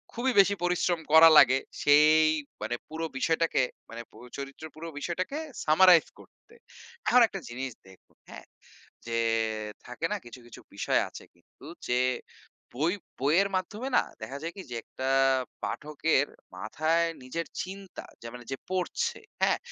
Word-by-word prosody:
খুবই 255 +3 +1
বেশি 200 +1 +5
পরিশ্রম 175 -1 +1
করা 165 +1 +10
লাগে, 130 -2 +7 0.2
সেই 150 +2 +6 0.4
মানে 110 +3 -2
পুরো 160 +1 -4
বিষয়টাকে 165 0 +1 0.3
মানে 115 +1 -7
পো - - -22 0.2
চরিত্রের 140 +3 -8
পুরো 165 +2 -8
বিষয়টাকে 180 - -3 0.3
সামারাইজ 170 +2 +6
করতে। 455 - -20 0.5
এখন 250 - +6
একটা 195 - -6
জিনিস 130 +2 -5 0.2
দেখুন, 95 -1 -20
হ্যাঁ? - - -11 0.6
যে 115 0 -2 0.7
থাকে 125 +6 -5
না 210 - 0
কিছু, 120 +1 -11
কিছু 120 - -12
বিষয় - - +1
আছে - - -11
কিন্তু 85 +9 -20 0.2
যে, 125 0 +2 0.7
বই 155 +8 0 0.3
বইয়ের 165 +9 +3
মাধ্যমে 210 +7 -3
না, - - +4 0.2
দেখা 115 +6 -6
যায় 165 +2 -5
কি 195 - -7
যে, - - -4
একটা 130 0 -5 0.5
পাঠকের 150 -1 0 0.3
মাথায় 155 - 0 0.2
নিজের 165 +7 -4 0.2
চিন্তা, 195 0 -9 0.2
যে 115 - -8
মানে 125 0 -9
যে 135 - -2
পড়ছে, 185 -1 -2 0.2
হ্যাঁ? - - +3
160 Hz, 145 wpm, -28 LUFS, 130-180 Hz, 0.7 s, করা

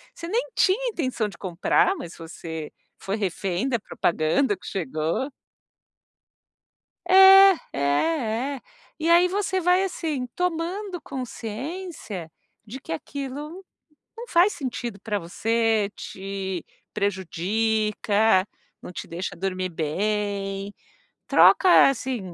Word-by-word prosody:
Você 335 - -7
nem 445 +7 +1
tinha 450 +7 +2
intenção 260 - -2
de 190 - -13
comprar, 185 - +1
mas 180 - -8
você 160 -1 -7 0.3
foi 195 - -3
refém 195 +2 -2
da 245 - +1
propaganda 195 - 0
que - - -16
chegou. 165 - -2 1.8
É, 385 +1 +9 0.2
é, - - -4 0.8
é. - - -14 0.4
E 320 +1 0
aí 345 +1 +6
você 380 0 -1
vai, 360 +2 +3
assim, 315 -8 -3
tomando 360 +2 -2
consciência 250 - -6 0.3
de 235 +5 -8
que - - -10
aquilo 285 - -6 0.5
não 475 +1 -7
faz 370 +1 +4
sentido 240 -6 -5
para 210 -1 -2
você, 220 +4 0
te 190 -2 -5 0.3
prejudica, 205 +2 +1 0.3
não - - -9
te - - -7
deixa 175 +3 -5
dormir 185 0 -2
bem. 195 +4 -2 0.5
Troca, 365 -6 +6
assim, 260 -2 -2
225 Hz, 110 wpm, -24 LUFS, -, 1.8 s, É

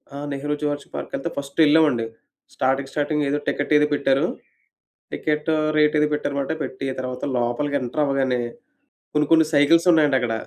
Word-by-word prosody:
ఆ! - - -5
Nehru 145 +2 -3
zoological 145 -1 -3
పార్క్‌కెళ్తే 155 - -4
first 140 +2 -6
ఎళ్ళామండి. 145 -7 +3 0.5
Starting, 135 +1 0
starting 150 0 -1
ఏదో 145 - 0
ticket 145 +1 -1
ఏదో 150 - +3
పెట్టారు. 135 -1 +2 0.9
టికెట్ 150 +1 -2 0.3
రేట్ 150 0 +3
ఏదో 150 - +3
పెట్టారనమాట. 140 -1 -2
పెట్టి 135 +1 -5
తర్వాత 125 0 -5
లోపలికి 120 +4 -1
ఎంటర్ 125 +5 -1
అవ్వగానే 135 -3 0 0.7
కొన్ని, 150 0 +2
కొన్ని 160 -1 +6
సైకిల్స్ 165 +5 +4
ఉన్నాయండక్కడ. 135 -7 +2
145 Hz, 145 wpm, -22 LUFS, 135-150 Hz, 0.9 s, కొన్ని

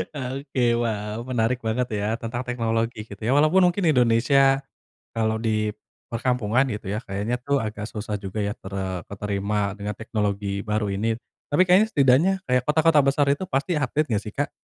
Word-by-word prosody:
Oke, 135 -1 -3 0.2
waw, 105 -1 -3
menarik 125 0 0
banget 120 +3 0
ya 105 - -1
tentang 120 +2 -4
teknologi, 115 -2 -2
gitu 100 0 -11
ya. 120 - +1
Walaupun 160 +5 +5
mungkin 195 +1 -3
Indonesia, 135 +1 +4 0.6
kalau 110 -1 +1
di 110 -2 0 0.4
perkampungan 125 0 +1
gitu 105 -1 -6
ya, 105 - -2
kayaknya 100 +5 -2
tuh 140 +2 +1
agak 105 0 -4
susah 105 -1 -4
juga 95 +2 -5
ya 105 0 -1
tere 95 -2 -5
keterima 100 0 -2
dengan 105 0 -5
teknologi 100 -3 -2
baru 105 -1 -1
ini. 110 +3 -1 0.3
Tapi 160 - +4
kayaknya, 195 +5 +5
setidaknya, 140 +7 +4
kayak 125 -1 +2
kota-kota 155 0 +4
besar 140 +1 +2
itu 145 +7 +1
pasti 155 +6 0
update, 150 +1 0
enggak 105 -2 +1
sih, 105 - -8
Kak? 145 - -1
115 Hz, 170 wpm, -24 LUFS, 105-135 Hz, 0.6 s, Walaupun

